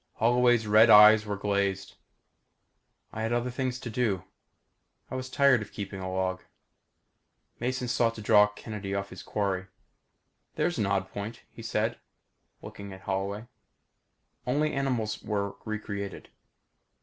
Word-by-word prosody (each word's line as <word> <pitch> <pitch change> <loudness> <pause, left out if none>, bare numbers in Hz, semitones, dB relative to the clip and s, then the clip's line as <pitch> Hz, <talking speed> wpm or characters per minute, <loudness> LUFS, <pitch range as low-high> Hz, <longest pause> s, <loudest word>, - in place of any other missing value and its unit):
Holloway's 120 0 +3
red 110 +2 +6
eyes 105 0 +8
were 105 - -2
glazed. 100 -1 -1 1.2
"I 110 - -4
had 115 +1 -1
other 120 +1 0
things 130 0 -2
to 120 - -5
do. 110 -6 0 0.9
I - - -4
was 130 0 -4
tired 140 -3 +4
of 110 - -8
keeping 100 -2 -6
a 95 0 -4
log." 95 0 -1 1.2
Mason 125 +1 -2
sought 120 -2 +1
to 110 - -8
draw 105 -1 +6
Kennedy 105 -1 -6
off 100 0 -3
his - - -9
quarry. 95 -2 -2 0.9
"There's 175 -5 0
an 105 - +1
odd 95 -1 -1
point," 105 +3 -6
he - - -11
said, 110 +1 -1 0.6
looking 100 -1 -9
at 95 - -12
Holloway. 100 +3 -3 1.0
"Only 150 +4 +1
animals 125 -6 -1
were 100 -2 -2
recreated. 100 -2 -5
105 Hz, 135 wpm, -28 LUFS, 100-120 Hz, 1.2 s, eyes